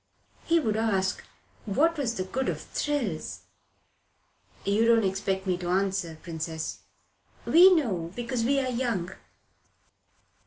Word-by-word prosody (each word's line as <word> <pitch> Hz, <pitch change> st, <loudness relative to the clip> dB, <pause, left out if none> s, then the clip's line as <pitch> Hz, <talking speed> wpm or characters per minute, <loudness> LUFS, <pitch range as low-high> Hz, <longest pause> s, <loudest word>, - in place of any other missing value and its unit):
"He 335 Hz, 0 st, +3 dB
would 220 Hz, -8 st, 0 dB
ask 195 Hz, -4 st, 0 dB, 0.4 s
what 310 Hz, +11 st, +2 dB
was 255 Hz, -6 st, -2 dB
the 185 Hz, -, -2 dB
good 260 Hz, +8 st, -2 dB
of -, -, -3 dB
thrills." 255 Hz, -, -3 dB, 1.2 s
"You 205 Hz, +3 st, +2 dB
don't 230 Hz, -1 st, +5 dB
expect 190 Hz, 0 st, -1 dB
me 185 Hz, -2 st, 0 dB
to 175 Hz, -1 st, -4 dB
answer, 190 Hz, -3 st, 0 dB
Princess." 160 Hz, -1 st, -5 dB, 0.7 s
"We 360 Hz, +4 st, +8 dB
know 185 Hz, -, -1 dB
because 240 Hz, 0 st, -2 dB
we're 270 Hz, +1 st, +1 dB
young." 235 Hz, -8 st, -1 dB
210 Hz, 120 wpm, -27 LUFS, 185-255 Hz, 1.2 s, We